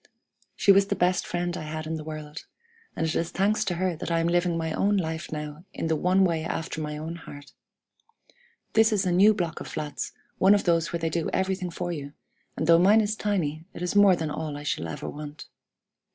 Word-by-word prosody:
She 200 - +5
was 195 0 +5
the - - 0
best 180 0 +1
friend 175 0 -2
I - - -5
had 155 0 -5
in 160 - -3
the 155 -1 -4
world, 155 -1 -8 0.5
and 165 - -1
it 160 - -1
is 165 - -1
thanks 210 +3 +1
to 175 - -1
her 180 0 0
that - - -5
I 165 0 +2
am 165 - +1
living 175 0 +1
my 160 -1 -2
own 205 +4 +2
life 160 -3 -3
now 150 +1 -6
in 165 - -2
the 160 - +2
one 185 +4 +3
way 165 -3 +1
after 165 -1 -3
my 150 0 -4
own 160 +2 -5
heart. 145 -3 -11 1.2
This 225 +1 +5
is 205 -2 +1
a 180 - +1
new 200 +5 +6
block 170 -4 -2
of - - -7
flats, 150 -2 -4 0.3
one 195 +2 +6
of 205 - 0
those 165 -2 +2
where 170 - -2
they 165 -1 -1
do 165 0 -1
everything 190 -1 -1
for 175 +1 -4
you; 145 -3 -6 0.4
and - - -1
though 165 +1 +6
mine 205 +5 +6
is 215 0 -1
tiny, 170 -8 -1
it - - -5
is 180 - -2
more 200 -2 +7
than 160 -3 -3
all 150 -1 -4
I 145 - -8
shall 85 - -2
ever 80 - -6
want. 150 0 -8
170 Hz, 230 wpm, -26 LUFS, 155-185 Hz, 1.2 s, more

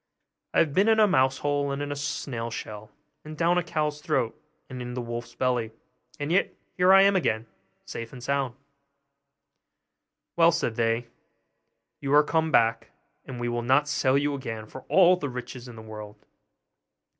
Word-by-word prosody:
'I - - +3
have 155 -4 0
been 195 +6 +3
in 220 -1 +4
a 215 - +7
mouse 135 -8 +2
hole 145 -1 -1
and 140 - -3
in 145 0 -3
a - - -2
snail 130 -5 -4
shell 110 -1 -7 0.3
and 155 0 -9
down 175 +2 +3
a - - -2
cow's 150 -2 -2
throat 115 -5 0 0.3
and 130 -1 -7
in 125 0 -6
the - - -3
wolf's 120 0 -6
belly; 120 -3 0 0.5
and 145 +2 -3
yet 190 +3 +1 0.2
here 180 +1 +4
I 195 0 +8
am 200 0 +4
again, 115 -10 0 0.4
safe 115 -1 -7
and 125 -2 -11
sound.' 135 -2 -1 1.8
'Well,' 170 0 +6
said 160 -9 -1
they, 115 +1 0 0.9
'you 140 +1 +1
are 150 - +7
come 160 +1 0
back, 115 -2 +2 0.4
and 125 -2 -7
we 120 - -2
will 120 0 -1
not 135 +5 +3
sell 135 -2 +2
you 145 +1 0
again 115 -6 -5
for 130 +4 -11
all 185 -1 +6
the 145 -5 -4
riches 125 0 -7
in 120 - -10
the 110 - -10
world. 105 -1 -9
135 Hz, 180 wpm, -26 LUFS, 120-150 Hz, 1.8 s, I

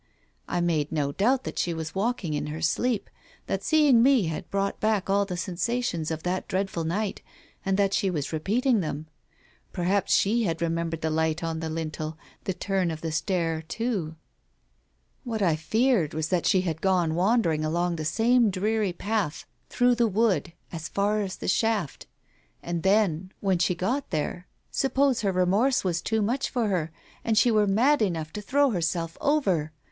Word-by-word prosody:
I 175 - -1
made 160 -4 0
no 145 -3 0
doubt 245 - +1
that - - -5
she 170 -1 0
was 160 -1 -5
walking 195 -5 -1
in 150 - -2
her 155 +1 -5
sleep 225 +8 0 0.2
— - - -28
that - - -2
seeing 295 -7 +5
me 260 -2 +5
had 160 -2 -4
brought 200 0 -1
back 215 -3 +1
all 200 0 +3
the 180 -2 -5
sensations 185 -2 -2
of 160 -1 -4
that 180 +1 -2
dreadful 190 -3 -2
night, 200 +5 -2 0.4
and 195 0 0
that 200 -1 +2
she 195 - +1
was 155 -4 -3
repeating 225 - +1
them. 155 -3 -3 0.7
Perhaps 190 +2 0
she 225 +4 +3
had 165 -3 -1
remembered 165 -1 -2
the 160 - -1
light 160 +1 0
on 165 -1 -2
the 160 0 -3
lintel, 155 -1 -4 0.3
the 190 - -1
turn 190 -1 0
of 160 -1 -5
the 165 - -3
stair 165 -1 -1
too?... 185 -2 -3 1.1
What 225 -4 -2
I 170 -4 +3
feared 215 - +1
was 160 0 -2
that 180 -2 +1
she 185 - +4
had 165 -3 -3
gone 180 -4 +2
wandering 175 -4 +2
along 170 +2 0
the 155 - -3
same 225 +8 +3
dreary 205 0 0
path 200 -4 -2 0.2
through 245 0 +3
the 235 -1 +2
wood, 200 -6 +1 0.2
as 160 -2 -6
far 205 +2 +1
as 190 -2 -3
the - - -7
shaft. 210 -5 0 0.6
And 170 -1 -3
then, 190 -2 +1
when 190 -3 +1
she 180 +1 +2
got 245 +11 -2
there, 165 +3 -3 0.2
suppose 270 -1 +1
her 200 -3 +1
remorse 200 +9 +2
was 170 -3 0
too 220 +2 0
much 245 +6 -1
for 235 -5 0
her 165 -5 -1 0.3
and 225 -2 0
she 240 - +5
were 210 -2 +3
mad 245 +9 +3
enough 165 -6 -1
to 210 - -5
throw 280 +5 +2
herself 165 -3 -1
over 190 - +1
185 Hz, 185 wpm, -26 LUFS, 165-220 Hz, 1.1 s, seeing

